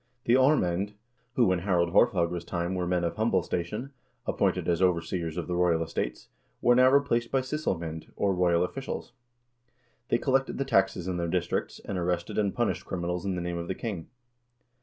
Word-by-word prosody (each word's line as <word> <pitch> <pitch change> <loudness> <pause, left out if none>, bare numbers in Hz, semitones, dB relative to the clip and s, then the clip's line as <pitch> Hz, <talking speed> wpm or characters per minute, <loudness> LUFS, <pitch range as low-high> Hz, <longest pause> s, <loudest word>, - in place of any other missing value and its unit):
The 115 - +3
aarmamd, 105 - +3 0.4
who 120 -7 +4
in 90 - +1
Harald 85 -2 +1
Haarfagre's 90 -6 +3
time 85 +1 -2
were 90 -1 -1
men 90 -1 +1
of 85 - -2
humble 105 -5 +2
station, 105 +12 -3 0.3
appointed - - 0
as 85 0 +1
overseers 85 -2 0
of 90 - -2
the 90 - -3
royal 85 -2 +2
estates, 65 -6 -4 0.3
were 120 - +4
now 130 +1 +6
replaced 130 -4 +2
by 135 - +2
sysselmoend, 85 - -3
or 100 -1 +1
royal 90 -1 +3
officials. 135 +6 -5 1.0
They - - +3
collected 135 +1 +1
the 140 - -1
taxes 95 -6 +2
in 90 -1 -1
their 85 -1 -1
districts, 85 0 -1
and 95 - -3
arrested 85 +1 -1
and 100 -2 +1
punished 120 +1 -1
criminals 90 0 -3
in 95 - 0
the 90 - -3
name 85 0 -3
of 85 - -5
the 95 - -2
king. 100 -8 -5
90 Hz, 180 wpm, -28 LUFS, 85-115 Hz, 1.0 s, now